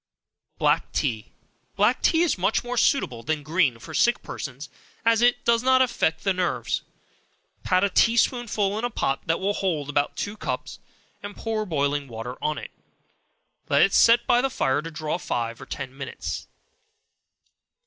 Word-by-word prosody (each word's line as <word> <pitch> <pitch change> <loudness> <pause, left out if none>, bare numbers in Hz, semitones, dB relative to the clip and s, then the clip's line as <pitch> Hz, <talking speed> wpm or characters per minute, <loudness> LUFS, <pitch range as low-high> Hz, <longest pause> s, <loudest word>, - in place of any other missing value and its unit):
Black - - +1
Tea. 110 -2 -2 0.4
Black - - +2
tea 330 0 +3
is 345 - +2
much 190 +4 0
more 245 0 -4
suitable 225 - +1
than 150 +5 -2
green 155 -5 +1
for 115 - -11
sick 240 - +2
persons, 140 0 -7 0.4
as 230 0 +4
it 245 0 +3
does 235 0 +3
not 260 +1 +4
affect 165 -10 -1
the 195 - +2
nerves. 180 -1 -1 0.8
Pat 185 +1 +2
a 200 - +3
tea 230 0 +4
spoonful 215 -4 +1
in - - -5
a 245 - 0
pot 135 - -1
that 165 +1 +1
will 200 +2 0
hold 155 -8 -2
about 145 0 0
two 205 +1 -3
cups, 215 - -5 0.4
and 205 0 -8
pour 220 -1 -2
boiling 145 -3 0
water 115 +1 -6
on 150 0 0
it. - - -7 1.0
Let 140 +1 +5
it 195 - +2
set 235 +1 +5
by 240 - +4
the 270 - 0
fire 135 - 0
to 165 - -7
draw 155 +1 -3
five 115 -7 -3
or 130 - -10
ten 135 -1 -6
minutes. 140 - -6
180 Hz, 170 wpm, -25 LUFS, 140-230 Hz, 1.0 s, Let